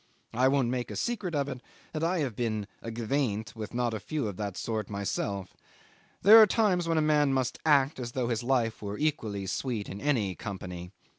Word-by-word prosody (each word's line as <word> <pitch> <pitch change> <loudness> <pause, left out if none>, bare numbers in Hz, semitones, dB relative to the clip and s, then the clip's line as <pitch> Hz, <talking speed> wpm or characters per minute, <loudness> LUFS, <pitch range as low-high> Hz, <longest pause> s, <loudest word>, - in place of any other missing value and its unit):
I 125 +3 +3
won't 135 -3 +2
make 125 -1 -2
a - - -6
secret 210 -8 -2
of 140 -1 0
it 130 -3 -6 0.3
that 155 0 -2
I 170 0 +1
had 130 -7 -2
been 110 -3 -1 0.2
"aguaindt" 115 -1 -2
with 110 -1 -6
not 120 -1 0
a 110 - -3
few 145 +3 -2
of 100 - -4
that 100 -3 -4
sort 110 -3 -3
myself. 100 -1 -3 0.7
There 220 +3 +10
are 215 - +8
times 190 -6 +2
when 165 -1 +1
a 155 - +3
man 150 -2 +3
must 130 -2 0
act 140 -2 +4
as 120 -2 -5
though 130 -2 0 0.2
life 120 -3 0
were 100 0 -4
equally 110 -10 -1
sweet 110 +1 -2
in 100 +2 -7
any 115 -10 +1
company. 90 -4 -7
120 Hz, 200 wpm, -29 LUFS, 105-145 Hz, 0.7 s, There